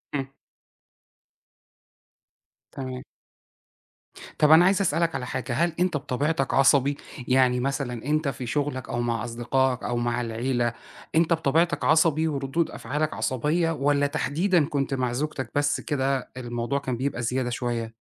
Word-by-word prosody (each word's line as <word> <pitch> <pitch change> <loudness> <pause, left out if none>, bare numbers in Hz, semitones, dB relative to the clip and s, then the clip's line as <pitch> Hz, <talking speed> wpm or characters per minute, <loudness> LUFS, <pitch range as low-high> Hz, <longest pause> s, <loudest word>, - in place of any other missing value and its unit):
إمم. 135 -1 -3 2.4
تمام. 130 -1 -6 1.4
طَب 150 0 +5
أنا 165 +3 +8
عايز 195 +1 +3
أسألك 165 -2 +1
على 130 -2 -3
حاجة، 125 0 -3
هل 170 +5 +1
أنت 180 -4 +2
بطبيعتك 140 +1 -1
عصبي؟ 140 +1 +4 0.3
يعني 125 -1 +3
مثلًا 125 -3 -3
أنت 155 +1 +1
في 135 -2 -3
شغلك 140 -1 -2
أو 120 - -1
مع 115 -2 -1
أصدقائك 120 +2 0
أو 120 - -1
مع 120 0 0
العِيلة، 120 +1 -1 0.4
أنت 165 +1 +4
بطبيعتك 160 0 +1
عصبي 160 0 +3
وردود 140 +2 -1
أفعالك 150 +1 -2
عصبية، 155 +6 0
والّا 145 -1 +1
تحديدًا 160 +3 +1
كنت 140 -1 -2
مع 125 -2 0
زوجتك 140 0 -3
بس 145 0 +1
كده 135 -2 -1
الموضوع 120 +2 -2
كان 130 -3 -3
بيبقى 130 -1 -2
زيادة 125 +1 -1
شوية؟ 120 -2 -3
135 Hz, 135 wpm, -25 LUFS, 125-150 Hz, 2.4 s, أنا